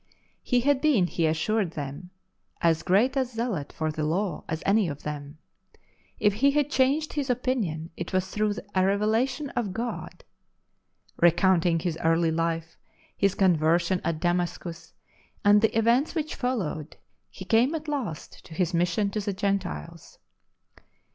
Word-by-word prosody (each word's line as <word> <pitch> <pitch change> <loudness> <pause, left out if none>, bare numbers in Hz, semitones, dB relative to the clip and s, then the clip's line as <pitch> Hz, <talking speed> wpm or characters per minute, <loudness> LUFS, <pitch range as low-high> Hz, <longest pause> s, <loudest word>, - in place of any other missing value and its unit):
He 250 -2 +1
had 280 +1 +2
been, 275 - +4
he 170 -2 0
assured 170 +3 0
them, 145 +4 -6 0.5
as 165 -1 +2
great 225 +9 +2
a 270 - +3
zealot 230 - -3
for 155 -1 -2
tire 155 0 -3
Law 175 +3 -1
as 160 0 -3
any 200 -1 +3
of 145 -3 -6
them; 145 0 -6 0.8
if 210 -1 +3
he 265 +7 +3
had 295 0 +1
changed 280 +4 +2
his 285 -3 -2
opinion, 225 -11 -1
it 175 - -6
was 185 -1 0
through 210 +1 -1 0.2
a 185 - +3
revelation 225 +8 +1
from 210 -6 -2
God. 240 - -5 0.9
Recounting 175 0 +4
his 165 -1 -3
early 165 0 +3
life, 165 0 -2 0.4
his 200 -2 +1
conversion 175 0 +2
at 165 -1 -1
Damascus, 175 -1 -2 0.5
and 205 0 +6
the 220 0 +2
events 235 +8 +2
which 310 0 -2
followed, 185 - -3 0.3
he 190 - -10
came 240 - +3
at 310 0 -5
last 255 - -5
to 160 - -11
his 180 0 0
mission 175 +4 +1
to 215 - -2
the 200 -1 -2
Gentiles. 190 - -3
190 Hz, 150 wpm, -26 LUFS, 165-240 Hz, 0.9 s, and